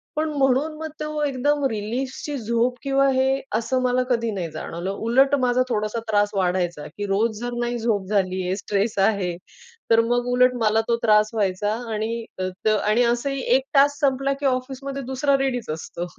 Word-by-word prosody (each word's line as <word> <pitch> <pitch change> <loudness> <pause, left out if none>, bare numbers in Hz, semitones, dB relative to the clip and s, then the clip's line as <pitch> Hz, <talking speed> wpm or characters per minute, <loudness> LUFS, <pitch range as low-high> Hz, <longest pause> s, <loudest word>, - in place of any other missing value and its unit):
पण 310 +1 0
म्हणून 270 +3 +2
मग 315 0 -4
तो 305 0 -2
एकदम 290 +1 0
रिलीफची 250 +7 -4
झोप 235 +1 0
किंवा 275 0 +2
हे 265 +1 +1
असं 235 +3 0
मला 255 0 +2
कधी 230 -2 +1
नाही 185 -5 -3
जाणवलं 170 +4 -5
उलट 250 +7 +3
माझा 250 0 +2
थोडासा 215 0 -1
त्रास 205 -1 +3
वाढायचा 180 -4 0
की 205 - -3
रोज 210 +2 0
जर 245 0 -3
नाही 240 0 -1
झोप 220 -4 0
झालीये, 185 -2 0
स्ट्रेस 205 +2 -1
आहे, 195 -3 +1 0.6
तर 225 0 +6
मग 245 0 +1
उलट 250 0 +4
मला 220 0 +3
तो 235 - +3
त्रास 215 -1 +4
व्हायचा 205 -1 0 0.2
आणि 225 +2 -3 0.2
त 185 +2 -4
आणि 215 +2 +2
असंही 245 +3 0
एक 265 - +2
टास्क 285 0 +4
संपला 275 0 +1
की - - -2
ऑफिसमध्ये 270 +1 -2
दुसरा 265 +2 +1
रेडीच 260 -3 -2
असतो. 165 +2 -6
235 Hz, 170 wpm, -23 LUFS, 210-265 Hz, 0.6 s, तर